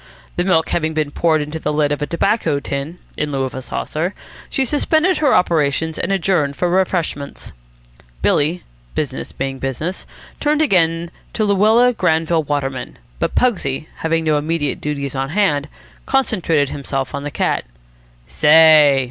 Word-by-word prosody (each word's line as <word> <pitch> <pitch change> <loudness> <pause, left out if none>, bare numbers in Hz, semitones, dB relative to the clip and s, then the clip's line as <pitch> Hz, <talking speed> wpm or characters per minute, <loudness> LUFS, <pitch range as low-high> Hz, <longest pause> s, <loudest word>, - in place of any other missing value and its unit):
The 175 - 0
milk 170 -4 +2
having 160 -1 -1
been 155 -2 -1
poured 160 0 +2
into 150 +2 -6
the 150 - -2
lid 150 -1 +1
of 145 - -2
a 145 - -1
tobacco 170 -4 0
tin, 140 +4 -5 0.2
in 150 -1 -2
lieu 135 -1 -1
of 130 - -4
a 130 - -5
saucer, 155 +8 -3 0.3
she 270 - 0
suspended 315 +6 +2
her 295 -3 +3
operations 160 -2 +1
and - - -1
adjourned 170 -7 +1
for 180 - 0
refreshments. 175 -6 -1 0.7
Billy, 160 +5 +1 0.3
business 135 -3 -3
being 135 0 -4
business, 145 +8 -4 0.3
turned 300 0 +1
again 170 - +2 0.2
to 215 - 0
Luella 215 +5 +4
Granville 165 -4 +1
Waterman, 140 -4 -3 0.2
but - - -1
Pugsy, 160 - 0
having 165 0 0
no 155 -2 +2
immediate 150 -2 -2
duties 140 -2 -3
on 135 0 -2
hand, 155 -6 +1 0.4
concentrated 180 - +1
himself 135 -1 -4
on 140 - -3
the 145 - -4
cat. - - -1 0.6
"Say!" 150 - +6
160 Hz, 155 wpm, -19 LUFS, 145-180 Hz, 0.7 s, Say